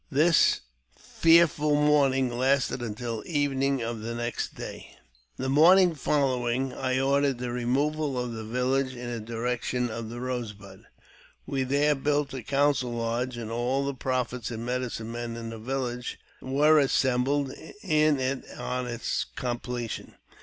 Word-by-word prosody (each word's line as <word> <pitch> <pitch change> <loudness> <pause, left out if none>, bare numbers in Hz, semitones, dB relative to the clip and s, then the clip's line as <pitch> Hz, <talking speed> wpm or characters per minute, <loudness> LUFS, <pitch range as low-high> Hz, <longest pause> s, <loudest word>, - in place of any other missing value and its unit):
This 155 +3 +4 0.4
fearful 165 -3 +4
mourning 135 -4 +3
lasted 130 +1 +1
until 115 0 -4
evening 140 -4 0
of 115 0 -3
the 115 +2 -4
next 120 0 -3
day. - - -9 0.4
The 130 - -3
morning 170 +6 +6
following 130 -3 0
I 130 0 -1
ordered 140 0 +2
the 125 0 -4
removal 140 +4 0
of 125 -1 -2
the 110 -1 -6
village 130 +3 0
in 120 0 -6
the 120 - -3
direction 120 +2 -2
of 115 0 -5
the 120 +1 -7
Rose 125 -3 -3
Bud. 100 -1 -14 0.6
We 135 -1 -2
there 140 +3 +2
built 145 0 0
a 130 - -4
council 135 -1 +1
lodge, 120 +2 -2
and 115 -1 -5
all 125 +4 0
the 140 - -1
prophets 125 -2 -2
and 115 -1 -5
medicine 125 -2 -3
men 120 0 -4
in 115 -1 -6
the 115 - -7
village 125 0 -3 0.2
were 150 +4 +4
assembled 135 0 +1 0.3
in 155 -2 +3
it 130 +1 -1
on 125 0 -3
its 120 -1 -2
completion. 120 -2 -4
130 Hz, 145 wpm, -27 LUFS, 120-140 Hz, 0.6 s, morning